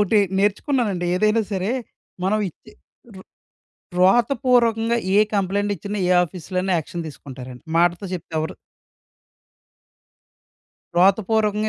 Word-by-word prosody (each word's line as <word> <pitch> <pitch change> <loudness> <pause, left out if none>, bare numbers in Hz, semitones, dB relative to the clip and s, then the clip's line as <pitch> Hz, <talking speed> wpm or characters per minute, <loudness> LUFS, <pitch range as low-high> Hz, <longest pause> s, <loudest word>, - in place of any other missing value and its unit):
ఒటి 205 +1 +3 0.2
నేర్చుకున్నానండి. 205 - 0
ఏదైనా 215 +3 +2
సరే 190 +2 -1 0.5
మనం 210 +3 +2
ఇచ్చే - - -19 0.4
వ్రా 190 - -12 0.7
వ్రాతపూర్వకంగా 235 +2 +3 0.2
ఏ - - +5 0.2
కంప్లెయింట్ 205 +1 0
ఇచ్చినా 200 +3 -5
ఏ - - +2
ఆఫీస్‌లో 180 +1 -8
అయినా 190 0 -1
యాక్షన్ 170 +2 -5
తీసుకుంటారండి. 130 -4 -10
మాటతో 175 +2 +2
చెప్తే 175 -2 -6
ఎవరు 160 +4 -3 2.4
వ్రాత 190 +3 +5
పూర్వకంగా 215 -1 +1
200 Hz, 110 wpm, -22 LUFS, 175-215 Hz, 2.4 s, ఏ